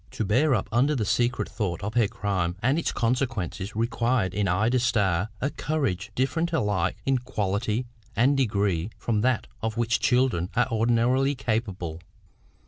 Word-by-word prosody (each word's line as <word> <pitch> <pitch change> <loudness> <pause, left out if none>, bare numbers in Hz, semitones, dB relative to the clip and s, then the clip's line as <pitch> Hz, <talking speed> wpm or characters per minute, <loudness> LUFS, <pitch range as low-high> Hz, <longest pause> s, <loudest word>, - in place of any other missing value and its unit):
To 110 - -3
bear 130 +8 +3
up 95 - -2
under 135 +6 +3
the 110 -5 0
secret 120 +4 +1
thought 100 -4 -3
of 105 +2 -3
her 115 -3 +3
crime 95 -4 -2
and 135 +6 +3
its - - -1
consequences 115 - -2
required 115 -3 0
in 105 -1 0
Ida 110 +8 +2
Starr 105 -5 +1
a 140 - -1
courage 115 - -2
different 160 +6 0
alike 105 - 0
in 135 -1 +2
quality 110 -1 -1 0.3
and 130 +6 +4
degree 100 -8 +1
from 110 -3 0
that 125 -1 +1 0.2
of 110 0 -2
which 115 -1 +1
children 125 -9 +2
are 125 0 +3
ordinarily 120 +5 +2
capable. 100 -9 -3
115 Hz, 155 wpm, -26 LUFS, 100-125 Hz, 0.3 s, and